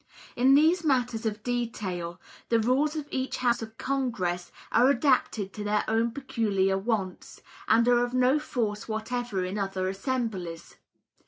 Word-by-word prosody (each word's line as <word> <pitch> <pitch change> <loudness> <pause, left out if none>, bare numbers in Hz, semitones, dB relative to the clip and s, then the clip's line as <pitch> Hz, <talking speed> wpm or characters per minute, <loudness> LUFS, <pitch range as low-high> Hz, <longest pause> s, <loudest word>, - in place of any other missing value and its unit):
In 260 +3 +5
these 325 +4 +4
matters 245 -6 +1
of 210 0 -4
detail, 195 -8 -3 0.3
the 230 - +4
rules 270 +7 +2
of 300 -2 -4
each 260 0 -2
House 240 -2 +1
of 220 0 -8
Congress 225 -10 -2 0.2
are 245 +4 +5
adapted 250 -7 +1
to 210 - -5
their 210 0 +1
own 225 +1 +2
peculiar 210 -7 0
wants, 195 -2 -3 0.2
and 230 +1 +4
are 245 0 +4
of 245 - -2
no 255 +3 +3
force 225 -8 -3
whatever 220 -3 -2
in 190 +3 -3
other 195 -1 -2
assemblies. 195 -5 -3
230 Hz, 150 wpm, -27 LUFS, 195-255 Hz, 0.3 s, In